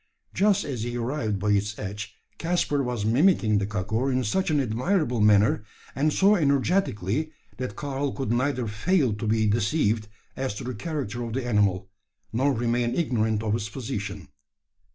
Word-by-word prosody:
Just 200 0 +2
as 130 -6 -4
he 120 +1 -3
arrived 115 -4 -1
by 105 +2 0
its 105 +1 0
edge, 105 0 -6 0.2
Caspar 165 -4 +1
was 125 -5 -2
mimicking 115 - +3
the 100 - -1
kakur 105 +6 -1
in 130 0 +1
such 185 - 0
an 150 -2 +2
admirable 125 - 0
manner, 105 0 +4 0.3
and 150 +4 +1
so 200 +6 +4
energetically, 145 - +1 0.3
that 125 -5 -4
Karl 140 -1 -2
could 135 -5 -3
neither 130 +1 0
fail 125 - +1
to 105 +2 -4
be 110 0 +2
deceived 110 0 +1 0.3
as 130 -5 -3
to - - -6
the 125 +1 -4
character 120 -3 -4
of 115 -1 -5
the 130 0 -2
animal, 100 -5 +1 0.5
nor 135 +5 +2
remain 120 -1 0
ignorant 110 -9 0
of 105 -1 0
its 105 -2 -2
position. 105 -3 -5
120 Hz, 165 wpm, -26 LUFS, 105-140 Hz, 0.5 s, manner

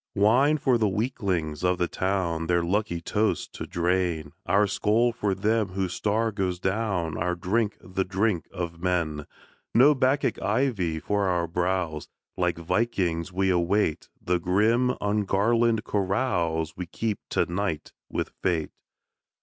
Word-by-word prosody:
Wine 125 +9 +4
for 130 -4 +2
the 110 - +3
weaklings 95 - -2
of 90 0 +2
the 90 - +1
town, 90 -4 -1
Their 85 0 +2
lucky 90 -1 -1
toasts 105 +5 0
to - - -7
drain! 85 -3 0 0.2
Our 100 +4 +4
skoal 110 +4 +2
for 105 -4 -1
them 105 0 0
whose 95 -2 -2
star 110 +4 0
goes 95 -3 -2
down, 95 -5 -1
Our 90 +1 0
drink 105 +5 0
the 95 +1 -2
drink 95 -1 0
of 85 -3 -5
men! 85 -5 -1 0.5
No 135 +6 +7
Bacchic 135 +1 +1
ivy 100 -8 0
for 100 +3 0
our 90 -2 +1
brows! 85 -2 -1 0.3
Like - - 0
vikings, 85 -2 -1
we 95 +1 +1
await 90 -1 +1
The 90 0 0
grim, 115 +8 +2
ungarlanded 105 +3 +2
carouse 90 -7 0
We 90 -1 -5
keep 105 +3 -2
to - - +1
night 90 -3 -3 0.2
with - - -2
Fate. 85 -4 0
95 Hz, 140 wpm, -26 LUFS, 85-110 Hz, 0.5 s, No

